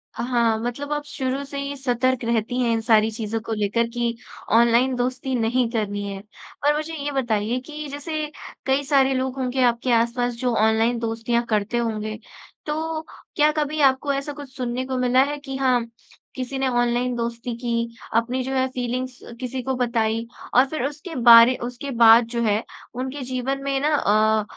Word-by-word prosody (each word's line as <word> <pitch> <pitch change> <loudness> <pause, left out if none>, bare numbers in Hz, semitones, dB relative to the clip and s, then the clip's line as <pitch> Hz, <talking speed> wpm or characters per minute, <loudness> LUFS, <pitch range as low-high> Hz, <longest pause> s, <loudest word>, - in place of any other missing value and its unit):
हाँ, 235 -2 +1
मतलब 245 +5 -4
आप 295 0 -2
शुरू 265 0 -3
से 280 0 -7
ही 280 0 -4
सतर्क 255 -1 0
रहती 235 +2 0
हैं 235 -1 +2
इन 225 - 0
सारी 220 -1 +4
चीज़ों 225 0 -3
को 225 0 -4
लेकर 215 +3 0
कि 235 -1 -1 0.4
ऑनलाइन 235 +2 +4
दोस्ती 255 +1 -2
नहीं 235 +1 +1
करनी 205 -3 -2
है। 195 0 -6 0.4
और 295 0 +4
मुझे 310 +2 -3
ये 290 0 -3
बताइए 240 -2 0
कि, 305 -1 -7
जैसे 300 +1 -4 0.3
कई 270 +1 +2
सारे 270 -1 +3
लोग 260 0 -1
होंगे 255 0 -1
आपके 240 +1 +1
आसपास 235 +1 +1
जो 245 0 -1
ऑनलाइन 225 +2 +2
दोस्तियाँ 230 +1 -1
करते 215 +2 0
होंगे। 215 -2 -2 0.5
तो, 315 +1 -2 0.3
क्या 300 0 +4
कभी 300 0 0
आपको 275 +1 +3
ऐसा 275 +1 -3
कुछ 280 -2 -11
सुनने 250 0 -3
को 260 -1 -3
मिला 255 +1 +4
है 290 +1 -3
कि 270 -2 -7
हाँ, 250 -3 +2 0.5
किसी 260 +1 -4
ने 265 - +1
ऑनलाइन 240 0 +1
दोस्ती 235 0 -3
की, 235 -1 -2 0.2
अपनी 245 +3 +1
जो 265 +1 -4
है, 260 0 +2
फीलिंग्स 255 0 -4 0.2
किसी 255 0 -4
को 265 +1 -1
बताई 230 -2 0 0.3
और 255 +2 +7
फिर 310 -5 -3
उसके 300 +4 -6
बारे 230 +2 +9
उसके 250 +3 -5
बाद 230 +1 +8
जो 235 - +1
है, 215 +1 +1 0.3
उनके 260 +3 -4
जीवन 270 +2 -2
में 275 -1 0
ना 300 +1 +2
अ, 215 -2 +3
250 Hz, 180 wpm, -23 LUFS, 230-270 Hz, 0.5 s, बारे